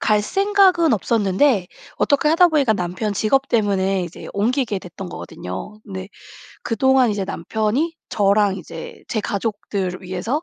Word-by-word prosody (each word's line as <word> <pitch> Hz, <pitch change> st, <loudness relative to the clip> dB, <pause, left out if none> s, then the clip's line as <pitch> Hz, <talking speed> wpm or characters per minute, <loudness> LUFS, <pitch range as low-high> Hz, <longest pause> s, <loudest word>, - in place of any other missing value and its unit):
갈 210 Hz, -1 st, +2 dB
생각은 385 Hz, -, +3 dB
없었는데 205 Hz, 0 st, +2 dB, 0.3 s
어떻게 285 Hz, +1 st, +2 dB
하다 345 Hz, +3 st, +5 dB
보니까 285 Hz, -8 st, +3 dB
남편 185 Hz, +4 st, -2 dB
직업 270 Hz, +7 st, +1 dB
때문에 195 Hz, -4 st, +1 dB
이제 175 Hz, -, -9 dB
옮기게 220 Hz, 0 st, 0 dB
됐던 180 Hz, +1 st, -8 dB
거거든요. 95 Hz, -, -7 dB
근데 190 Hz, -1 st, -7 dB, 0.5 s
그동안 260 Hz, 0 st, +3 dB
이제 200 Hz, -2 st, -2 dB
남편이 220 Hz, -, -1 dB, 0.2 s
저랑 200 Hz, -1 st, +3 dB
이제 165 Hz, -1 st, -9 dB
제 215 Hz, -, -1 dB
가족들을 200 Hz, -3 st, -3 dB
위해서 190 Hz, -, -2 dB
210 Hz, 320 characters per minute, -21 LUFS, 190-265 Hz, 0.5 s, 하다